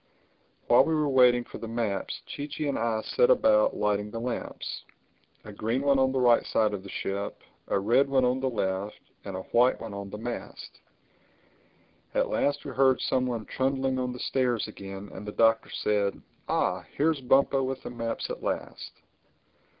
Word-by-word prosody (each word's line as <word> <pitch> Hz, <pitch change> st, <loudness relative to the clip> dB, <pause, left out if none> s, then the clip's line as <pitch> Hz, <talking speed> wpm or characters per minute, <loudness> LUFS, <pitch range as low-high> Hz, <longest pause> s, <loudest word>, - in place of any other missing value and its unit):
While 120 Hz, -, +6 dB
we 160 Hz, -, +1 dB
were 150 Hz, -1 st, +1 dB
waiting 125 Hz, -3 st, +5 dB
for -, -, -10 dB
the 115 Hz, -, -6 dB
maps 115 Hz, -4 st, -3 dB
Chee 145 Hz, -, -6 dB
Chee 150 Hz, 0 st, -4 dB
and 140 Hz, -, -1 dB
I 115 Hz, -1 st, 0 dB
set 485 Hz, +1 st, +2 dB
about 275 Hz, -, +4 dB
lighting 105 Hz, 0 st, 0 dB
the 115 Hz, -, -5 dB
lamps: 120 Hz, +1 st, -4 dB, 0.6 s
a 105 Hz, -, -9 dB
green 115 Hz, +6 st, -1 dB
one 140 Hz, -1 st, +3 dB
on 130 Hz, 0 st, +3 dB
the 135 Hz, -, 0 dB
right 120 Hz, -2 st, +5 dB
side 105 Hz, -1 st, +1 dB
of 100 Hz, -, -4 dB
the 100 Hz, -, -11 dB
ship, 100 Hz, +1 st, -4 dB, 0.3 s
a -, -, +1 dB
red 120 Hz, +8 st, +3 dB
one 130 Hz, -2 st, +3 dB
on 125 Hz, +1 st, +1 dB
the 130 Hz, 0 st, 0 dB
left 100 Hz, -3 st, -2 dB, 0.3 s
and 100 Hz, -2 st, -5 dB
a 95 Hz, -, -5 dB
white 125 Hz, +2 st, +4 dB
one 115 Hz, -3 st, -7 dB
on 100 Hz, 0 st, -6 dB
the 105 Hz, -, -7 dB
mast. 120 Hz, +2 st, -7 dB, 1.4 s
At -, -, +2 dB
last 145 Hz, +1 st, 0 dB
we 140 Hz, -, -5 dB
heard 130 Hz, 0 st, +3 dB
some 130 Hz, -1 st, 0 dB
one 115 Hz, -3 st, -3 dB
trundling 130 Hz, 0 st, -1 dB
on 125 Hz, 0 st, -1 dB
the 125 Hz, -, -7 dB
stairs 125 Hz, -3 st, 0 dB
again 95 Hz, +1 st, -9 dB
and 95 Hz, -, -8 dB
the 105 Hz, -, -6 dB
Doctor 115 Hz, 0 st, +3 dB
said, 100 Hz, -1 st, 0 dB, 0.3 s
"Ah, -, -, 0 dB
here's 155 Hz, -1 st, +2 dB
Bumpo 135 Hz, +1 st, +3 dB
with 130 Hz, 0 st, -3 dB
the -, -, -6 dB
maps 115 Hz, -1 st, -3 dB
at -, -, -6 dB
last!" -, -, -4 dB
120 Hz, 190 wpm, -28 LUFS, 105-135 Hz, 1.4 s, While